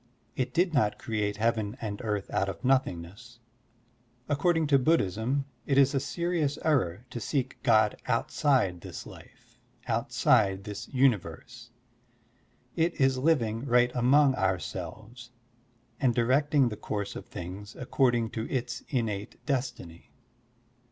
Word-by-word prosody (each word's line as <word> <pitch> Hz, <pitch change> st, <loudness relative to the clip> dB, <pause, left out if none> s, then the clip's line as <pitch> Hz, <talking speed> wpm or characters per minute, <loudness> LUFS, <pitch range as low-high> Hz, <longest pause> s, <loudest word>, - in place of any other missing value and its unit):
It 130 Hz, -, -1 dB
did 175 Hz, 0 st, +1 dB
not 110 Hz, -8 st, +2 dB
create 105 Hz, -3 st, -2 dB
heaven 110 Hz, -2 st, 0 dB
and 105 Hz, -3 st, -5 dB
earth 105 Hz, -3 st, -2 dB
out 95 Hz, +1 st, 0 dB
of 95 Hz, -, -7 dB
nothingness. 115 Hz, -2 st, -1 dB, 0.9 s
According 160 Hz, +3 st, +2 dB
to 140 Hz, -2 st, +4 dB
Bud 160 Hz, +6 st, +4 dB
dhism, 110 Hz, +9 st, -1 dB, 0.2 s
it 135 Hz, -, +2 dB
is 140 Hz, 0 st, +5 dB
a 135 Hz, -, +2 dB
serious 160 Hz, -1 st, -1 dB
error 120 Hz, -, +1 dB
to 120 Hz, -, -5 dB
seek 130 Hz, +3 st, -2 dB
God 110 Hz, -4 st, +4 dB
outside 110 Hz, -, +1 dB
this -, -, -8 dB
life, -, -, -15 dB, 0.3 s
outside 95 Hz, -2 st, +2 dB
this 105 Hz, +2 st, -7 dB
tmiverse. 120 Hz, -, -1 dB, 1.1 s
It 165 Hz, +1 st, 0 dB
is 135 Hz, -1 st, +3 dB
living 120 Hz, -7 st, +1 dB
right 125 Hz, 0 st, +4 dB
among 135 Hz, +3 st, +4 dB
ourselves 95 Hz, +4 st, -4 dB, 0.7 s
and 125 Hz, -4 st, +2 dB
directing 135 Hz, +2 st, +3 dB
the 105 Hz, -, -6 dB
course 100 Hz, -2 st, -4 dB
of -, -, -8 dB
things 95 Hz, +5 st, -8 dB
according 120 Hz, -3 st, +1 dB
to 110 Hz, -1 st, -4 dB
its 125 Hz, -1 st, -3 dB
innate 110 Hz, -6 st, -2 dB
destiny. 125 Hz, -, -4 dB
120 Hz, 130 wpm, -28 LUFS, 105-135 Hz, 1.1 s, is